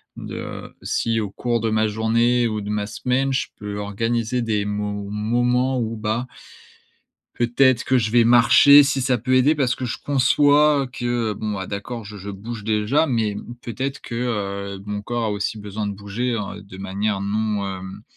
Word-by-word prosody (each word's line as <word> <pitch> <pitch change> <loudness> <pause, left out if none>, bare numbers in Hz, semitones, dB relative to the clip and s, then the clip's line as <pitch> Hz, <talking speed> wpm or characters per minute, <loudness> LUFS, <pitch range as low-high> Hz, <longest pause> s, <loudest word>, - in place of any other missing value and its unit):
de - - -7
si 115 -1 0
au 105 -2 -2
cours 120 +4 -1
de 115 - 0
ma 110 0 +2
journée 115 +3 +2
ou 110 -1 -2
de 100 - -6
ma 105 -1 -1
semaine, 130 +4 0
je 130 - 0
peux 105 0 -6
organiser 115 +4 -1
des 105 -3 0
mo 105 -1 -3
moments, 120 +4 +1
où, 115 -1 -2
bah 110 +3 -2 1.1
peut-être 125 +1 +3
que 130 - +3
je 110 -2 -1
vais 120 - +6
marcher 120 +5 +7
si 135 -1 0
ça 125 -2 +1
peut 130 +4 0
aider 140 +4 +4
parce 130 -3 +1
que 130 - -5
je 120 - -3
conçois, 145 +2 +4
heu, - - -5
que, 120 -3 -2
bon, 105 +1 -4
bah, 95 -1 -4
d'accord, 110 +3 -5
je 105 +1 -9
je 100 +1 -7
bouge 105 +3 -7
déjà, 110 +8 +1
mais 110 -5 0
mmh, 120 +4 -8
peut-être 130 +4 -4
que, - - -8 0.6
heu, 95 - -11
mon 105 0 -4
corps 120 +1 -2
a 110 - 0
aussi 105 +2 -2
besoin 105 0 -4
de - - -3
bouger, 105 +5 -3
heu, 105 -2 -5
de 95 -1 -12
manière 100 +1 -2
non, 105 0 -1
hem 95 +1 -7
115 Hz, 190 wpm, -22 LUFS, 105-125 Hz, 1.1 s, marcher